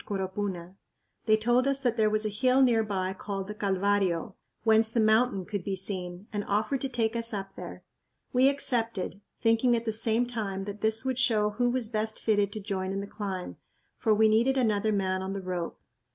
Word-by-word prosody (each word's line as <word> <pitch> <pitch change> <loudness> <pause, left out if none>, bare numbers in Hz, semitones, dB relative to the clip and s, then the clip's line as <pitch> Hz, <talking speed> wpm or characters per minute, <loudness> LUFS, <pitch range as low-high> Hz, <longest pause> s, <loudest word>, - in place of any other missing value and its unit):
Coropuna. 190 -2 -4 0.5
They 215 0 +5
told 240 +4 +2
us 275 0 0
that 245 -3 +1
there 215 -2 +3
was 215 0 0
a - - +1
hill 255 +5 +3
near 230 -3 +4
by 190 -3 -2
called 195 0 -5
the 210 - -5
Calvario, 195 -2 0 0.3
whence 220 0 +4
the 230 - 0
mountain 220 -2 +3
could 200 -2 -4
be 195 +1 -2
seen, 185 -1 -3
and 205 -1 -1
offered 215 +7 0
to 270 - -1
take 230 -2 -1
us 230 -1 -1
up 195 -1 -6
there. - - -8 0.5
We 260 +2 +5
accepted, 230 -8 -1 0.2
thinking 230 +2 +4
at 230 0 -2
the 220 - -1
same 225 +2 +2
time 210 -5 -3
that 205 +1 -7
this 220 +3 +1
would 260 -1 -1
show 215 -5 +2
who 245 +3 +1
was 245 -2 -1
best 220 -1 -2
fitted 205 -2 +1
to 215 - -5
join 190 -2 -3
in 195 - -2
the - - -5
climb, 195 -3 -5 0.4
for 225 - 0
we 220 +1 +5
needed 235 +5 +3
another 220 -3 +2
man 190 -2 0
on 190 +1 -4
the 200 - -3
rope. 180 -2 -4
215 Hz, 205 wpm, -28 LUFS, 195-230 Hz, 0.5 s, They